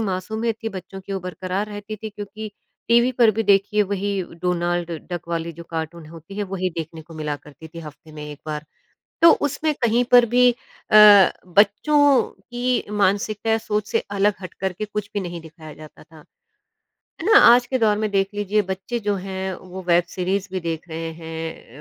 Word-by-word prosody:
मासूमियत 220 Hz, +3 st, -2 dB
थी 225 Hz, -, 0 dB
बच्चों 190 Hz, -1 st, -8 dB
की 195 Hz, +1 st, -8 dB
वो 190 Hz, -, -2 dB
बरकरार 185 Hz, +2 st, -4 dB
रहती 210 Hz, +1 st, -7 dB
थी 220 Hz, +1 st, -7 dB
क्योंकि 210 Hz, +1 st, -8 dB, 0.4 s
टीवी 235 Hz, +2 st, +4 dB
पर 235 Hz, -2 st, +5 dB
भी 225 Hz, +2 st, -1 dB
देखिए 205 Hz, +1 st, +3 dB
वही 200 Hz, -1 st, -2 dB, 0.2 s
डोनाल्ड 175 Hz, -1 st, -1 dB, 0.2 s
डक 175 Hz, -1 st, -5 dB
वाली 170 Hz, 0 st, -3 dB
जो 170 Hz, +1 st, -11 dB
कार्टून 160 Hz, 0 st, -5 dB
होती 165 Hz, +5 st, -12 dB
है 205 Hz, -, 0 dB
वही 185 Hz, -1 st, -3 dB
देखने 160 Hz, 0 st, -6 dB
को 165 Hz, +1 st, -14 dB
मिला 150 Hz, -2 st, -3 dB
करती 150 Hz, +2 st, -14 dB
थी 165 Hz, -, -11 dB
हफ़्ते 150 Hz, 0 st, -12 dB
में 150 Hz, -1 st, -8 dB
1 145 Hz, -, -11 dB
बार। 150 Hz, -1 st, -4 dB, 0.6 s
तो 335 Hz, -, +9 dB
उसमें 300 Hz, +2 st, -1 dB
कहीं 235 Hz, +2 st, +3 dB
पर 245 Hz, -1 st, +8 dB
भी 245 Hz, +2 st, +5 dB
अ, 235 Hz, -3 st, -1 dB, 0.5 s
बच्चों 255 Hz, -, +4 dB
की 245 Hz, +1 st, -2 dB
मानसिकता 205 Hz, +2 st, 0 dB
या 225 Hz, -, +3 dB
सोच 210 Hz, -1 st, -2 dB
से -, -, +2 dB
अलग 200 Hz, +1 st, +2 dB
हट 185 Hz, -, -8 dB
करके 190 Hz, +2 st, -2 dB
कुछ 210 Hz, 0 st, -5 dB
भी 205 Hz, -, -1 dB
नहीं 175 Hz, -2 st, -6 dB
दिखाया 160 Hz, -1 st, -12 dB
जाता 155 Hz, -1 st, -14 dB
था। 155 Hz, -2 st, -17 dB, 1.0 s
है -, -, -5 dB
ना? 425 Hz, 0 st, +7 dB
आज 240 Hz, +1 st, +7 dB
के 260 Hz, -, 0 dB
दौर 210 Hz, -2 st, +3 dB
में 215 Hz, 0 st, -1 dB
देख 195 Hz, -1 st, +2 dB
लीजिए 205 Hz, +1 st, +1 dB
बच्चे 190 Hz, +5 st, -4 dB
जो 205 Hz, -1 st, -1 dB
हैं, 190 Hz, 0 st, -4 dB
वो 185 Hz, +1 st, -9 dB
वेब 175 Hz, 0 st, +4 dB
सीरीज़ 190 Hz, +2 st, -2 dB
भी 185 Hz, -, -2 dB
देख 165 Hz, 0 st, -4 dB
रहे 165 Hz, 0 st, -4 dB
हैं 160 Hz, -4 st, -8 dB
195 Hz, 195 wpm, -22 LUFS, 170-215 Hz, 1.0 s, तो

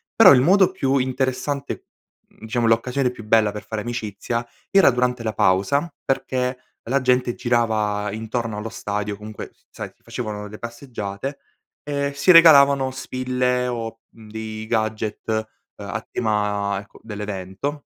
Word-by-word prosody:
Però -, -, +9 dB
il 125 Hz, -, +5 dB
modo 190 Hz, +5 st, +5 dB
più 140 Hz, -7 st, +1 dB
interessante, 130 Hz, +2 st, -1 dB
mhmm -, -, -12 dB, 0.5 s
diciamo 115 Hz, +1 st, -2 dB
l'occasione 125 Hz, +3 st, +2 dB
più 120 Hz, -2 st, -10 dB
bella 110 Hz, -1 st, +3 dB
per 105 Hz, -, -7 dB
fare 110 Hz, -1 st, -4 dB
amicizia 115 Hz, 0 st, -3 dB, 0.3 s
era 195 Hz, -6 st, +7 dB
durante 125 Hz, -1 st, 0 dB
la 110 Hz, -1 st, -2 dB
pausa 100 Hz, -, +2 dB
perché 130 Hz, -1 st, -1 dB, 0.3 s
la 140 Hz, -, +3 dB
gente 125 Hz, -1 st, +1 dB
girava 110 Hz, -4 st, 0 dB
intorno 110 Hz, 0 st, -3 dB
allo 110 Hz, +2 st, -4 dB
stadio, 105 Hz, -1 st, -3 dB
comunque 105 Hz, +1 st, -8 dB, 0.2 s
sai -, -, -7 dB
facevano 105 Hz, -3 st, -5 dB
le 105 Hz, +1 st, -10 dB
passeggiate, 120 Hz, +1 st, -6 dB, 0.5 s
e 140 Hz, -1 st, -2 dB
si 145 Hz, +6 st, +5 dB
regalavano 140 Hz, -5 st, +7 dB
spille 125 Hz, -1 st, -1 dB
o, 115 Hz, -2 st, -4 dB
mhmm, 110 Hz, -2 st, -16 dB
dei 110 Hz, 0 st, -6 dB
gadget, 110 Hz, -1 st, -1 dB, 0.6 s
uhm, -, -, -8 dB
a -, -, -3 dB
tema, 105 Hz, -3 st, 0 dB
ecco, 100 Hz, -, -18 dB
dell'evento 105 Hz, +6 st, -5 dB
115 Hz, 140 wpm, -22 LUFS, 105-130 Hz, 0.6 s, Però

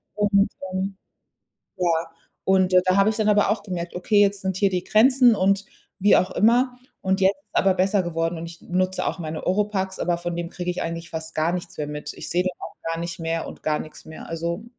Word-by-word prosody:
Und, 200 Hz, -1 st, +3 dB, 0.2 s
ähm, 190 Hz, +1 st, -2 dB, 0.8 s
ja. 180 Hz, -1 st, +1 dB, 0.6 s
Und 190 Hz, -1 st, +3 dB
da 185 Hz, 0 st, +3 dB
habe 200 Hz, +1 st, +5 dB
ich 220 Hz, -, -3 dB
dann 215 Hz, -1 st, +2 dB
aber 205 Hz, 0 st, +4 dB
auch 210 Hz, -1 st, 0 dB
gemerkt, 175 Hz, -3 st, -5 dB
okay, 205 Hz, +3 st, +2 dB
jetzt 200 Hz, -1 st, +2 dB
sind 190 Hz, -1 st, -2 dB
hier 200 Hz, 0 st, +4 dB
die 180 Hz, -1 st, -2 dB
Grenzen 250 Hz, +2 st, +5 dB
und, 195 Hz, +1 st, +2 dB, 0.4 s
wie 205 Hz, +2 st, +6 dB
auch 185 Hz, -, +2 dB
immer 245 Hz, +3 st, +3 dB, 0.3 s
und 190 Hz, +1 st, +1 dB
jetzt 190 Hz, +1 st, +5 dB
ist 195 Hz, +2 st, -35 dB
aber 195 Hz, -, +4 dB
besser 190 Hz, +1 st, +2 dB
geworden. 165 Hz, 0 st, -2 dB
Und 165 Hz, -, -6 dB
ich 165 Hz, 0 st, -11 dB
nutze 185 Hz, +1 st, -1 dB
auch -, -, -2 dB
meine 155 Hz, -1 st, -5 dB
Ohropax, 190 Hz, -1 st, 0 dB
aber 175 Hz, -1 st, 0 dB
von 175 Hz, 0 st, -4 dB
dem 170 Hz, 0 st, -4 dB
kriege 180 Hz, -1 st, -3 dB
ich 180 Hz, -, -3 dB
eigentlich 165 Hz, 0 st, -4 dB
fast 160 Hz, 0 st, -6 dB
gar 160 Hz, +2 st, +1 dB
nichts 180 Hz, -1 st, -5 dB
mehr 150 Hz, -, -2 dB
mit. 150 Hz, 0 st, -6 dB
Ich -, -, -7 dB
sehe 180 Hz, -, +2 dB
dann 180 Hz, -1 st, -3 dB
auch -, -, -8 dB, 0.2 s
gar 165 Hz, -, -3 dB
nicht 170 Hz, 0 st, -5 dB
mehr 165 Hz, 0 st, -2 dB
und -, -, -10 dB
gar 155 Hz, -1 st, 0 dB
nix 155 Hz, -, -9 dB
mehr. 155 Hz, -, -10 dB
Also 170 Hz, +4 st, -3 dB
185 Hz, 225 wpm, -24 LUFS, 170-200 Hz, 0.8 s, wie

